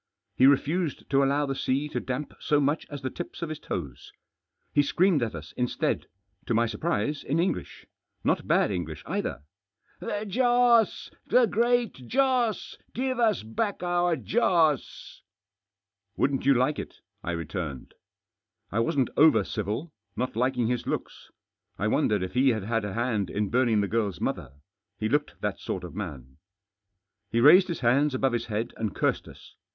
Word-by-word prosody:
He 130 - +6
refused 150 +4 +1
to 135 0 +4
allow 140 +2 +2
the 135 - -2
sea 135 +2 -1
to - - -2
damp 130 +3 -4
so 150 - +2
much 145 +3 0
as 145 -3 -7
the 130 - -2
tips 175 - -7
of 165 - -3
his 155 -1 -5
toes. 70 -8 -6 0.6
He 145 - +5
screamed 170 +2 +2
at 115 -6 -2
us 75 -2 -8
instead 125 -1 -1 0.2
— 100 0 -41
to 115 - +1
my 115 +1 +3
surprise, 150 +4 -2
in 145 - -1
English 180 +3 -2 0.2
— - - -49
not - - 0
bad - - +3
English 85 -5 -4
either. 65 - -3 0.3
" 110 - -38
The 210 +1 -3
Joss! 240 0 +3 0.2
The 250 -1 +5
Great 235 +2 +1
Joss! 255 -5 +1 0.2
Give 255 +1 -1
us 220 - +2
back 195 - -2
our 175 -1 +2
Joss! 165 - 0 0.3
" 100 0 -64
" 100 0 -53
Wouldn't 135 -1 0
you 140 - +6
like 130 +4 +1
it? - - -8
" - - -49
I 85 - -2
returned. 80 -4 -5 0.8
I 110 - 0
wasn't 125 +3 +1
over 155 +1 +6
civil, 110 - -4 0.2
not 125 -2 -2
liking 125 0 +1
his 125 +1 -1
looks. - - -4 0.5
I - - 0
wondered 105 -3 +1
if 95 - -5
he 130 +2 +4
had 110 -5 0
had 115 0 -1
a 100 - -4
hand 115 -6 0
in 105 -1 -1
burning 120 -3 +3
the 100 - 0
girl's 105 -3 -1
mother. - - -3 0.4
He 110 - -1
looked 145 +3 -1
that - - -2
sort - - -4
of - - -8
man. 65 -1 -7 0.9
He 115 - +1
raised 180 +9 +7
his 170 - -4
hands 135 +4 +3
above 130 -1 +1
his 120 -1 -2
head 110 +1 -3
and 110 -3 -3
cursed - - 0
us. - - -14
130 Hz, 180 wpm, -27 LUFS, 105-170 Hz, 0.9 s, raised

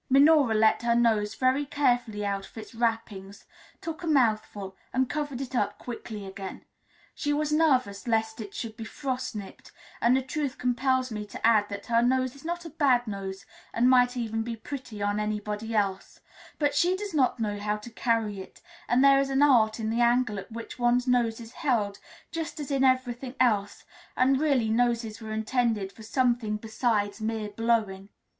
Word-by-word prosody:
Minora 280 -3 +5
let 220 0 +4
her 235 0 +2
nose 220 -3 +2
very 260 +2 +2
carefully 245 -7 0
out 200 -1 -2
of - - -19
its 220 - -9
wrappings, 225 -4 -3 0.4
took 325 +1 -6
a 340 - -5
mouthful, 215 -8 +1 0.2
and 260 +1 +1
covered 290 -3 -3
it 270 -1 -6
up 205 -3 0
quickly 220 -4 -7
again. 190 0 -8 0.5
She 290 - -2
was 300 +1 0
nervous 255 -9 +2
lest 220 -1 0
it 200 -2 -9
should 225 -2 -5
be 225 - -7
frost 260 +1 -4
nipped, 200 -2 -9 0.3
and 255 +2 +3
truth 280 -1 -2
compels 255 +1 0
me 210 -1 -5
to - - -5
add 215 -3 +4
that 200 0 -6
her 230 0 +3
nose 255 +1 +1
is 280 - -15
not 345 +1 -4
a 330 - -8
bad 270 -6 +3
nose, 195 -2 -6 0.3
and 235 +2 +4
might 250 0 +4
even 225 -2 -2
be 230 +1 -4
pretty 225 -3 -7
on 205 +1 0
anybody 210 +1 -3
else; 195 -2 -1 0.4
but 290 -2 +1
she 360 +2 +2
does 405 -2 -6
not 260 -5 +2
know 205 -2 -2
how 210 +1 -1
to 210 +3 -11
carry 225 -3 0
it, 190 - -13 0.3
and 245 +3 +3
there 275 0 +7
is 275 0 0
an 270 +1 +3
art 230 -6 +4
in 220 0 -2
the 235 +1 +1
angle 240 -3 +2
at 195 - -11
which 230 +2 -8
one's 245 +1 +2
nose 240 -3 +1
is 230 -1 -10
held 225 -10 -1 0.3
just 330 -1 -4
as 290 -1 -5
in 270 -1 +2
everything 255 -1 +1
else, 205 -5 +1 0.3
and 265 +1 +3
really 275 -7 +2
noses 230 -1 0
were 220 0 -7
intended 220 -2 0
for 220 - -15
something 235 -2 0
besides 220 -1 -1
mere 220 -1 -2
blowing. 205 -3 -1
235 Hz, 185 wpm, -27 LUFS, 215-260 Hz, 0.5 s, there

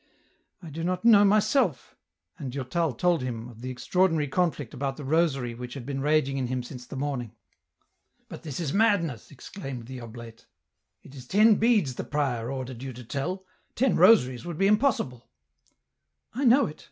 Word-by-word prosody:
I 165 - -9
do 165 +3 -5
not 185 +4 -2
know 215 -3 +7
myself; 210 - +2 0.2
" 85 +1 -39
and 135 -4 -5
Durtal 140 +4 -1
told 175 +5 +1
him 120 -2 -5
oi - - -14
the 125 +3 -7
extraordinary 160 +4 +1
conflict 150 -3 -1
about 135 0 -3
the 150 - -7
rosary 135 -5 +1
which 125 +2 -8
had 130 -4 -7
been 135 0 -4
raging 145 -2 +1
in 130 - -1
him 125 0 -2
since 125 0 -10
the - - -8
morning. 130 -5 -4 0.5
" - - -45
But - - -9
this 155 -3 -6
is 155 -5 -2
madness," 195 - +1
exclaimed 135 - -8
the 130 +1 -8
oblate; 115 0 -11 0.3
" - - -53
it - - -15
is 130 -3 -11
ten 215 - +5
beads 210 - +2
the - - -5
prior 130 -6 -2
ordered 130 -2 -6
you 135 -1 -6
to 125 +1 -10
tell; 175 - -4 0.3
ten 260 +2 +2
rosaries 130 - +5
would 170 -2 -6
be 195 - +2
impossible." 210 - +1 0.5
" 70 0 -55
I 270 +5 -1
know 255 +4 +6
it... 150 - -8
140 Hz, 190 wpm, -27 LUFS, 125-180 Hz, 0.5 s, know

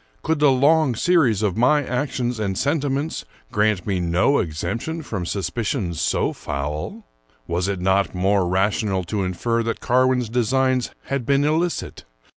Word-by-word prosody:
Could 160 -1 0
the 150 -1 +5
long 140 0 +3
series 130 - +2
of 100 -4 0
my 145 +5 +3
actions 125 -2 -2
and 95 -3 -2
sentiments 145 +1 -1 0.3
grant 105 -5 +1
me 95 -3 -1
no 90 +11 +2
exemption 100 - -3
from 95 -10 -4
suspicions 100 - -2
so - - 0
foul? 75 +2 -5 0.4
Was 90 +5 -1
it 100 -2 -2
not 95 +1 +1
more 95 0 +2
ra 95 +3 +2
tional 95 -3 -2
to 100 +3 -2
infer 115 +6 -1
that 115 0 -2
Carwin's 125 -1 +2
designs 130 +2 +1
had 140 -2 -2
been 140 +3 +2
illicit? 160 +3 -1
115 Hz, 150 wpm, -22 LUFS, 95-135 Hz, 0.4 s, the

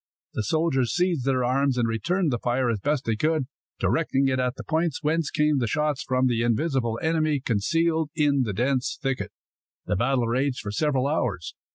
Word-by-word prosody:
The - - -1
soldiers 135 -1 0
seized 175 -6 +1
their 130 -2 +1
arms, 130 +1 +1
and 120 -2 +2
returned 165 +9 0
the 120 - -1
fire 120 +1 0
as 110 - -2
best 145 +6 -1
they 115 - 0
could, 155 +3 +1 0.3
directing 140 -4 +1
it 130 0 0
at 125 0 0
the - - -8
points 160 -2 -1
whence 160 +1 +1
came 150 -2 +2
the 120 - 0
shots 150 +3 0
from 130 0 +1
the 120 -3 +1
invisible 120 -1 0
enemy, 155 -2 +1
concealed 160 +8 0
in 145 -2 +2
the 115 -5 -1
dense 130 +4 0
thicket. 135 -4 -2 0.5
The - - 0
battle 120 +4 +1
raged 130 +2 0
for 100 - -5
several 135 +2 +1
hours. 125 - -1
135 Hz, 190 wpm, -25 LUFS, 120-155 Hz, 0.5 s, and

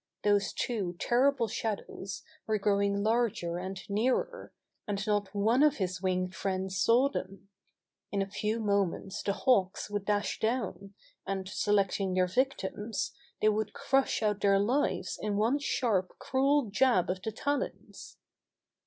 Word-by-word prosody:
Those 205 -1 +3
two 200 -8 -2
terrible 250 +2 +2
shadows 200 -3 -4 0.2
were 215 -1 +2
growing 200 0 +1
larger 215 -7 0
and 190 +1 -5
nearer, 250 - -1 0.4
and 200 -1 -2
not 205 -2 0
one 225 +6 +3
of 300 -1 +5
his 185 -2 -3
winged 185 -1 0
friends 190 0 -2
saw 240 +7 +5
them. 195 -7 -6 0.6
In 200 - -1
a 195 - 0
few 215 +3 -2
moments 200 -2 0
the 200 - 0
Hawks 200 -4 +1
would 205 -1 -2
dash 205 0 0
down, 200 -4 -2 0.3
and, 190 -1 -2
selecting 195 -2 +1
their 185 0 +4
victims, 220 -1 -1 0.3
they 215 - +6
would 215 0 -1
crush 270 -3 +1
out 210 -1 +1
their 200 -1 +4
lives 245 +9 0
in 210 -1 -1
one 230 +7 +2
sharp, 220 -10 0
cruel 270 -3 +1
jab 210 -5 +3
of 185 0 -5
the 220 - -3
talons. 285 +5 -4
205 Hz, 145 wpm, -30 LUFS, 195-230 Hz, 0.6 s, they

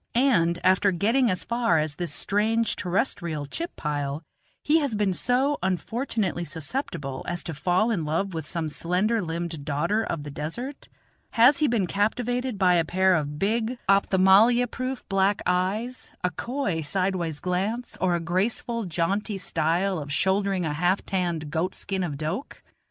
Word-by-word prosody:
And 220 -10 +3
after 190 +2 +4
getting 230 +8 +2
as 180 -2 -1
far 235 -7 +1
as 155 -1 0
this 170 0 -4
strange 220 +7 +1
terrestrial 175 - -1
chip 335 - -5
pile, 145 0 -3 0.4
he 310 +2 +4
has 280 -7 -1
been 205 -2 +1
so 260 +8 +1
unfortunately 190 0 -1
susceptible 160 - -5
as 175 0 -3
to 165 - -5
fall 180 +9 +1
in 185 -8 0
love 165 +6 -1
with 160 -1 -4
some 165 -2 -2
slender 185 +9 0
limbed 165 -3 -4
daughter 170 +9 0
of 165 -8 -3
the 145 - -7
desert? 235 - -5 0.5
has 250 +5 +6
he 305 - +3
been 230 -6 +1
captivated 245 +5 -1
by 185 -2 +4
a 165 - +3
pair 185 +3 +3
of 150 -3 -1
big, 225 +6 0
opthamalmia 200 +5 +5
proof, 255 0 -4
black 195 0 +1
eyes, 200 +8 -1
a 180 - +1
coy 215 - -2
sidewise 175 -1 -1
glance, 195 +7 -2
or 180 -2 +2
a - - 0
graceful, 205 +6 -1
jaunty 195 +5 -1
style 180 +1 0
of 145 -1 -6
shouldering 190 +2 +1
a 150 - -1
half 180 +5 +1
tanned 170 -5 -2
goat 165 +4 -1
skin 195 -1 -3
of 155 -6 -3
doke? 160 - -5
190 Hz, 160 wpm, -26 LUFS, 165-225 Hz, 0.5 s, has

